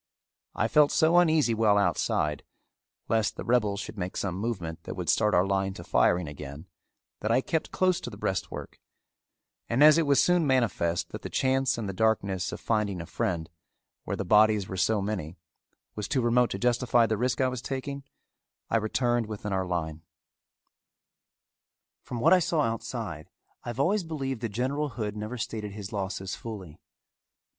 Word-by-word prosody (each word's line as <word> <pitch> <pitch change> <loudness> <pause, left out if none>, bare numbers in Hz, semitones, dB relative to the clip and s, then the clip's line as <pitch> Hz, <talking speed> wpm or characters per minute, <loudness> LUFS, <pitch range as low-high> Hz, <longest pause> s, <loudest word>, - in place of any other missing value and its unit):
I - - +1
felt 150 -1 +4
so 165 +1 +4
uneasy 160 -8 +3
while 110 -2 +3
outside, 80 -5 0 0.6
lest 110 -3 +1
the - - -6
rebels 105 -5 +1
should 105 0 -7
make 90 0 -4
some 95 -3 -2
movement 95 -5 -4
that - - -5
would - - -3
start 105 -1 +3
our 90 +1 +4
line 95 0 0
to 85 - -8
firing 90 0 +2
again 75 +1 -8 0.5
that 110 - -2
I 115 - +4
kept 160 +3 -2
close 185 -1 +1
to - - -5
the 105 - -10
breastwork, 95 -2 -4 0.9
and 125 +5 +3
as 155 +1 +8
it 160 - +1
was 140 -3 +4
soon 175 -3 +3
manifest 110 -10 +1
that - - -7
the - - -6
chance 130 -1 +1
in 115 - -3
the 100 - -4
darkness 100 -3 0
of - - -6
finding 105 -4 -1
a 85 - -5
friend, 85 -6 -2 0.6
where - - -3
the - - -3
bodies 105 0 +4
were 95 - -5
so 100 +2 +1
many, 90 -6 -4 0.6
was 105 -1 -4
too 130 - +1
remote 120 +1 +3
to - - -3
justify 120 +1 +3
the 110 0 0
risk 125 +3 -1
I 130 - +3
was 130 -2 -3
taking, 135 +1 -5 0.7
I - - +4
returned 120 +1 0
within 105 -1 -5
our 95 -1 -1
line. 80 -3 -3 2.0
From 120 - -6
what 120 - +5
I 185 - +6
saw 170 -1 -1
while 115 -7 +2
outside 110 -8 -6 0.3
I - - -6
have 120 +1 -6
always 190 +7 +2
believed 135 -7 -4
that 115 - -2
General 135 +7 -1
Hood 110 -5 -4
never 110 +4 -5
stated 105 -2 -4
his 105 0 -7
losses 95 -1 -3
fully. 95 -9 -8
110 Hz, 180 wpm, -28 LUFS, 95-130 Hz, 2.0 s, as